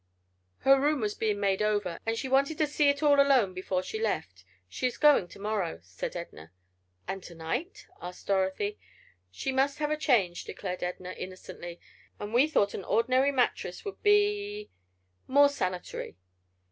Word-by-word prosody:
"Her 270 0 +5
room 295 0 +2
was 210 -2 -1
being 210 -2 -1
made 195 0 +1
over, 205 -5 0
and 225 0 0
she 265 - -3
wanted 275 +4 +2
to 310 - +3
see 295 0 +2
it 280 +2 0
all 290 -1 +5
alone 265 -9 +4
before 185 0 -2
she 220 +3 -5
left. 95 - -2 0.2
She 255 - -1
is 250 - -5
going 295 -11 +5
to - - -14
morrow," 200 - -2
said 90 - -6
Edna. 80 +1 -8 0.6
"And 195 0 -4
to 175 - -11
night?" 240 - -4 0.2
asked 180 0 -8
Dorothy. 195 +1 0 0.5
"She 95 - -3
must 270 +1 +1
have 300 0 -1
a - - +2
change," 220 - +1
declared 180 -2 -5
Edna, 180 0 -4
innocently, 175 -2 -8 0.4
"and 205 +2 -6
we 255 +5 +5
thought 205 -10 +2
an 195 - -5
ordinary 255 +6 +2
mattress 245 - -1
would 405 - -6
be—more 405 - +1
sanitary." 185 - -4
215 Hz, 165 wpm, -29 LUFS, 185-280 Hz, 0.6 s, Her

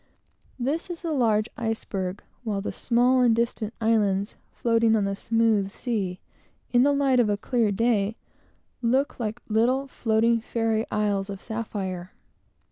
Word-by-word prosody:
This 285 +8 -2
is 350 0 -7
the 335 - -2
large 225 -6 +2
iceberg; 205 -4 -3 0.2
while 210 -4 -1
the 195 - -3
small 250 +2 +2
and 240 -2 +4
distant 230 -2 -1
islands, 210 -3 +1 0.2
floating 230 -1 +2
on 210 -2 +1
the 195 0 -1
smooth 220 -2 +1
sea, 195 -7 -3 0.5
in 245 - +6
the 285 +3 +4
light 275 -3 +3
of 230 -3 +3
a 205 - +1
clear 230 -1 +1
day, 220 0 +1 0.7
look 255 +4 +1
like 220 0 -4
little 240 +5 +2
floating 230 -2 +1
fairy 225 -1 -1
isles 205 -2 0
of 195 -1 -5
sapphire. 200 -5 -4
225 Hz, 145 wpm, -26 LUFS, 205-240 Hz, 0.7 s, in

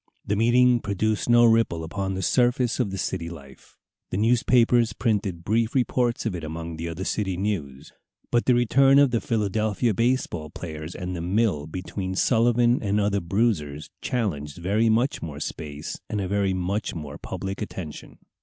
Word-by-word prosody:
The 105 - 0
meeting 120 +3 +4
produced 110 +2 -1
no 120 0 +6
ripple 115 -8 +3
upon 95 +3 -3
the 95 - -3
surface 125 +3 +2
of 120 -5 +1
the 95 - -5
city 85 -2 -3
life. 70 -6 -13 0.3
The - - -3
newspapers 115 0 +3
printed 100 -7 -1
brief 115 +5 0
reports 125 -2 +1
of 110 - -1
it 85 -2 -5
among 80 +1 -6
the 85 +1 -4
other 85 +3 -5
city 95 -2 -1
news. 80 -10 -4 0.4
But 120 0 +2
the 125 - +4
return 135 +3 +4
of 140 -2 +5
the 115 - +1
Philadelphia 110 +1 0
baseball 115 -9 0
players, 80 0 -7
and 90 0 -4
the 85 - -4
"mill" 90 -4 0
between 95 +2 -5
Sullivan 120 +2 +3
and 105 0 0
other 100 -1 +1
bruisers, 85 -7 -1
challenged 75 - -2
very 100 +6 +1
much 120 +5 +1
more 75 -3 -6
space 75 -1 -6
and 105 - -2
a 95 - -2
very 100 -1 0
much 95 +3 -2
more 75 -3 -7
public 95 +1 -5
attention. 90 -7 -7
100 Hz, 170 wpm, -25 LUFS, 85-115 Hz, 0.4 s, no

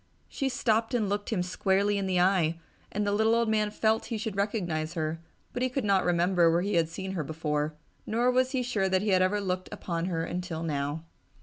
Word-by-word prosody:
She 275 - -2
stopped 230 -2 +1
and 220 -4 +1
looked 205 +1 -2
him 190 -6 0
squarely 195 +2 +1
in 195 - -2
the 185 -1 +1
eye 175 -3 +2 0.3
and 210 +1 -1
the 205 - +1
little 220 +2 +3
old 235 0 +2
man 215 -1 +2
felt 220 +1 +1
he 230 - -3
should 215 -1 -4
recognize 175 -6 -1
her, 160 0 -2 0.3
but 245 - -3
he 255 - +2
could 260 +1 -2
not 195 -2 +3
remember 175 0 +3
where 170 +2 +2
he 205 +1 -1
had 165 -2 +2
seen 190 +3 -5
her 175 -5 -2
before, 150 0 -2 0.3
nor 240 +3 +2
was 255 0 +2
he 260 -2 -1
sure 210 -6 0
that 190 +1 +2
he 215 - 0
had 185 -1 +4
ever 185 +3 +2
looked 185 -2 -2
upon 170 -1 -3
her 165 -3 -1
until 175 -1 -4
now. 145 0 -2
190 Hz, 225 wpm, -28 LUFS, 170-220 Hz, 0.3 s, had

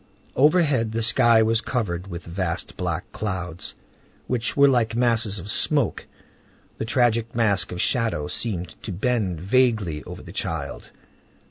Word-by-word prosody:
Overhead 145 -6 +3
the 115 0 0
sky 110 +1 +5
was 110 +1 +2
covered 100 -9 -3
with 85 -2 -7
vast 85 0 -3
black 90 -1 -3
clouds, 95 -4 -4 0.5
which 120 +1 -1
were 140 0 +7
like 120 -4 +2
masses 115 -4 +2
of 95 +3 -4
smoke. 145 -8 +1 0.7
The - - -2
tragic 115 -1 +1
mask 100 -5 +1
of 90 - -5
shadow 115 - 0
seemed 90 -7 -3
to 105 - -6
bend 100 -3 -1
vaguely 100 - +1
over - - -9
the - - -11
child. - - -4
110 Hz, 140 wpm, -24 LUFS, 90-120 Hz, 0.7 s, were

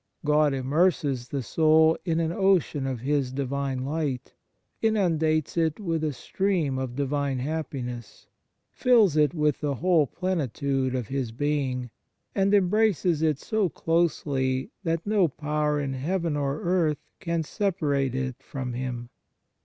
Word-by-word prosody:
God 150 -1 +3
immerses 140 -2 +1
the 140 -1 -3
soul 160 +4 +4
in 165 -2 +1
an 165 -1 0
ocean 175 -7 +2
of 130 -4 -3
His 140 -1 0
Divine 135 -1 -2
light, 145 -3 -3 0.5
inundates 165 -9 +1
it 160 0 +1
with 165 -6 -2
a 155 - +1
stream 155 0 -1
of 130 -2 -4
Divine 140 -1 -1
happiness, 125 -5 -5 0.5
fills 225 - +4
it 150 +2 +3
with 150 -3 +1
the 145 -2 -1
whole 165 0 +3
plenitude 140 -7 -1
of 125 -4 -3
His 130 -4 -2
Being, 130 -2 -1 0.4
and 195 0 +2
embraces 195 -4 +3
it 155 -3 +2
so 215 +2 0
closely 140 -6 0
that 165 -1 -1
no 205 -4 +3
power 150 0 -1
in 140 -2 -2
heaven 165 +4 -1
or 140 0 -1
earth 170 -4 +1
can 170 -3 -1
separate 150 - 0
it 130 -1 -3
from 130 -5 -5
Him. 120 -1 -5
150 Hz, 135 wpm, -26 LUFS, 135-170 Hz, 0.5 s, soul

